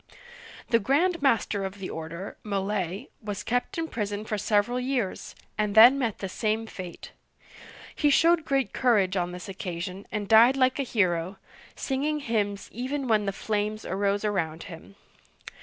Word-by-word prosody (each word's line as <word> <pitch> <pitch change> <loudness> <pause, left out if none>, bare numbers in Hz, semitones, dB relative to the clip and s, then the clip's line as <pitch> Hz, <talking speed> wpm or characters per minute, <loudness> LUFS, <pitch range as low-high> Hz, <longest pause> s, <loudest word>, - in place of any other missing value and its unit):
The 230 - +4
Grand 320 - +1
Master 225 -7 +1
of 190 +1 -5
the 190 -2 -6
order, 165 +4 -6
Molay', 200 +1 -2
was 205 -2 -5
kept 245 +7 -1
in 325 0 -1
prison 210 -5 -3
for 215 - -2
several 210 +4 +1
years, 250 -6 -2 0.2
and 210 -1 0
then 245 +5 +9
met 230 -6 -1
the 195 - -4
same 220 +3 -1
fate. 185 -5 -9 0.8
He 295 - +2
showed 330 +3 +4
great 275 -4 0
courage 205 -7 +2
on 180 -1 -1
this 180 +2 -8
occasion, 185 0 -6
and 210 -1 -3
died 235 +5 +6
like 255 +1 +2
a - - +3
hero, 185 -7 0 0.4
singing 295 +3 -1
hymns 205 -5 -1
even 260 +4 -3
when 215 -3 +2
the - - +1
flames 215 +1 -2
arose 200 +2 0
around 165 -6 -1
him. 180 +2 -11
210 Hz, 155 wpm, -27 LUFS, 195-250 Hz, 0.8 s, then